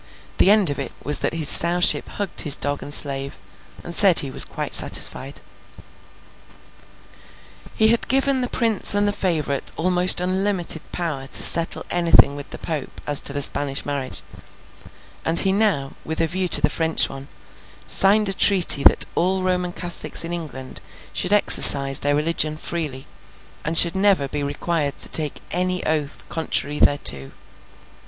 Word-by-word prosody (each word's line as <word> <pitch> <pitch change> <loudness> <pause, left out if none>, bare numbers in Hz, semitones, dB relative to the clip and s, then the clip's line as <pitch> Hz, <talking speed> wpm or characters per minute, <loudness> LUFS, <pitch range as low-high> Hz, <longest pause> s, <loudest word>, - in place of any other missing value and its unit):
The - - +3
end 205 -6 +1
of 140 - -8
it 140 - -8
was 145 - +1
that - - -4
his 160 -3 +1
Sowship 175 +4 +3
hugged 205 -3 -4
his 145 -3 +6
dog 145 0 -5
and 145 - -11
slave, 140 -2 +2 0.5
and 170 - -10
said 190 -2 +5
he 135 - +2
was - - +5
quite - - -8
satisfied. - - +2 2.3
He 220 0 +1
had 235 +1 -2
given 270 +1 -1
the 250 - -5
Prince 225 -4 -1
and 205 0 -1
the - - -1
favourite 155 -8 -4
almost 180 +2 +2
unlimited 185 -2 -3
power 150 -6 -6
to - - +1
settle 165 0 +3
anything 165 -5 +2
with 145 0 -11
the - - -8
Pope 155 -4 -8
as 145 -1 +2
to - - 0
the 145 0 +2
Spanish 140 0 +1
marriage; 140 -3 -7 1.0
and 165 +1 +1
he 190 - 0
now, 190 -10 -2
with 160 - -6
a 165 - 0
view 180 +3 -4
to - - +2
the 150 - -1
French 160 0 -1
one, 135 0 -12 0.6
signed 205 +2 +3
a 195 - 0
treaty 180 -7 +4
that - - +3
all 185 +1 -2
Roman 180 -1 -4
Catholics 175 -1 -3
in 165 +1 -7
England 145 -6 -10 0.3
should 180 - -3
exercise 140 -9 +7
their 145 0 -2
religion 155 0 -1
freely, 150 -5 -8 0.6
and 160 +2 -3
should 170 0 +3
never 190 -7 0
be 145 +2 -7
required 145 +1 -5
to - - 0
take 150 -3 +1
any 180 0 -3
oath 155 -2 -5
contrary 150 -3 -4
thereto. 70 - -2
165 Hz, 160 wpm, -19 LUFS, 145-185 Hz, 2.3 s, exercise